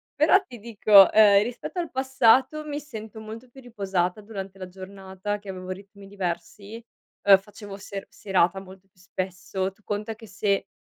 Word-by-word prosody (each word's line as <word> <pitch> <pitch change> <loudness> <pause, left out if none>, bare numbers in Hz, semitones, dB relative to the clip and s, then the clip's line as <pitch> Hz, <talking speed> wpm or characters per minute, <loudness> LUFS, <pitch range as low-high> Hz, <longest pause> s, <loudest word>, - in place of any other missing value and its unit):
però 310 +6 +5
ti 240 -7 -12
dico, 210 -3 +6
ehm, 205 -2 +6
rispetto 245 - -5
al 335 - -3
passato 265 +3 +3
mi 295 0 -4
sento 220 -7 -9
molto 220 +3 -9
più 265 +2 -14
riposata 195 -5 -2
durante 195 -2 -8
la 185 - -6
giornata 190 +2 -6
che 205 - -12
avevo 185 -1 -7
ritmi 195 +1 -10
diversi, 200 +3 -5 0.4
ehm, 195 -1 +8
facevo 200 0 -11
se 200 0 -7
serata 190 -2 +1
molto 190 0 -14
più 180 - -32
spesso. 185 +1 -4
Tu 195 - -30
conta 210 +2 -4
che 225 0 -14
se, 200 -1 -1
200 Hz, 165 wpm, -25 LUFS, 190-225 Hz, 0.4 s, ehm